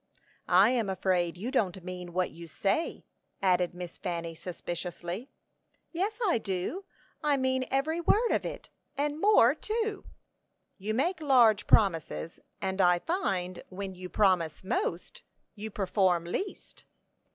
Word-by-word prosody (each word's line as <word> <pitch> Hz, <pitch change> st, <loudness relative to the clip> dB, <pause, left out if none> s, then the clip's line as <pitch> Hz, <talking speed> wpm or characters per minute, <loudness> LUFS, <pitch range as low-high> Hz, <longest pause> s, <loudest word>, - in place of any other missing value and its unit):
"I 190 Hz, +6 st, +6 dB
am 230 Hz, -5 st, 0 dB
afraid 180 Hz, -2 st, 0 dB
you 225 Hz, +8 st, -4 dB
don't 190 Hz, -8 st, 0 dB
mean 180 Hz, -1 st, -6 dB
what 180 Hz, +1 st, 0 dB
you 170 Hz, 0 st, -10 dB
say," 195 Hz, -, -1 dB, 0.3 s
added 180 Hz, -2 st, +2 dB
Miss 180 Hz, -1 st, -8 dB
Fanny, 170 Hz, -2 st, -3 dB
suspiciously. 175 Hz, -, -5 dB, 0.6 s
"Yes, 390 Hz, +5 st, -1 dB
I 350 Hz, -, +3 dB
do; 195 Hz, -, -3 dB, 0.4 s
I 295 Hz, -2 st, +3 dB
mean 260 Hz, 0 st, +1 dB
every 310 Hz, +5 st, 0 dB
word 445 Hz, +7 st, +3 dB
of -, -, +1 dB
it, -, -, -7 dB, 0.3 s
and 295 Hz, +2 st, -1 dB
more 400 Hz, -, +6 dB
too." 430 Hz, +3 st, -3 dB, 0.7 s
"You 215 Hz, +3 st, -2 dB
make 345 Hz, +8 st, 0 dB
large 240 Hz, -8 st, +5 dB
promises; 165 Hz, -4 st, +2 dB, 0.2 s
and 190 Hz, 0 st, -1 dB
I 175 Hz, -1 st, +5 dB
find 185 Hz, -, -2 dB
when 195 Hz, 0 st, -5 dB
you 180 Hz, 0 st, -8 dB
promise 180 Hz, -7 st, +2 dB
most, 180 Hz, -2 st, -2 dB, 0.3 s
you 215 Hz, 0 st, -6 dB
perform 190 Hz, -3 st, +1 dB
least." 380 Hz, -, -5 dB
195 Hz, 135 wpm, -29 LUFS, 180-270 Hz, 0.7 s, I